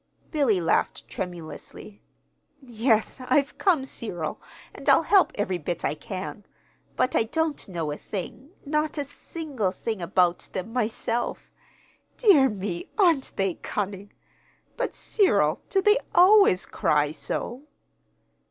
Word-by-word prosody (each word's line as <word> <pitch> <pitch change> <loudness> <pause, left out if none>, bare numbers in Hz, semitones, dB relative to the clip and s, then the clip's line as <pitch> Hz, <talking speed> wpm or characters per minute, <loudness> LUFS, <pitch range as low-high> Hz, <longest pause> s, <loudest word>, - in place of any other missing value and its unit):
Billy 275 - +2
laughed 165 - 0
tremulously. 175 +3 -8 0.6
"Yes, 235 -1 0
I've 275 +3 +1
come, 335 -9 +2
Cyril, 175 -11 -5 0.3
and - - -3
I'll - - +6
help 390 -3 +4
every 190 -3 -1
bit 170 +2 -3
I - - +1
can; 190 +6 -7 0.5
but 255 - +1
I - - +4
don't 320 +4 -2
know 165 -4 -3
a 145 - -4
thing 220 +7 -7 0.2
not 300 +1 -1
a 290 - -1
single 285 - -4
thing 215 +1 -4
about 175 0 +2
them 190 +5 -5
myself. 235 0 -2 0.7
Dear 325 - +6
me, 190 -4 -5
aren't 335 -10 +3
they 195 -2 0
cunning? 200 0 -4 0.6
But, - - -3
Cyril, 400 -4 +2
do 385 -1 +1
they 420 +3 +5 0.2
always 370 - +6
cry 150 -1 +1
so?" 240 - -4
225 Hz, 125 wpm, -26 LUFS, 185-290 Hz, 0.7 s, I'll